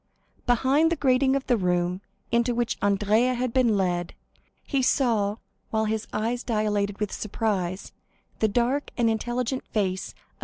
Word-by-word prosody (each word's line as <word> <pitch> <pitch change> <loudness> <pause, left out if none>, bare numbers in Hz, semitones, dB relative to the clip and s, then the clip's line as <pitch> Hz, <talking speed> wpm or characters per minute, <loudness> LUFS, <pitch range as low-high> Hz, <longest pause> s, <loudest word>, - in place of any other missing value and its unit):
Behind 270 +7 +3
the - - +2
grating 265 -2 +3
of 275 - -1
the 245 - +2
room 180 -1 0 0.3
into 235 +1 +2
which 240 -1 0
Andrea 210 +5 +2
had 245 -1 -2
been 240 -5 +3
led, 175 -2 -1 0.5
he 275 -2 0
saw, 225 -6 +2 0.3
while 220 0 0
his 220 0 -2
eyes 230 +3 -1
dilated 210 -3 -1
with 210 -2 -2
surprise, 195 -4 -2 0.5
the 220 - +3
dark 245 +7 0
and 230 -2 +3
intelligent 245 +3 -2
face 190 -3 -2
of - - -34
M. - - -29
225 Hz, 155 wpm, -26 LUFS, 205-250 Hz, 0.5 s, Behind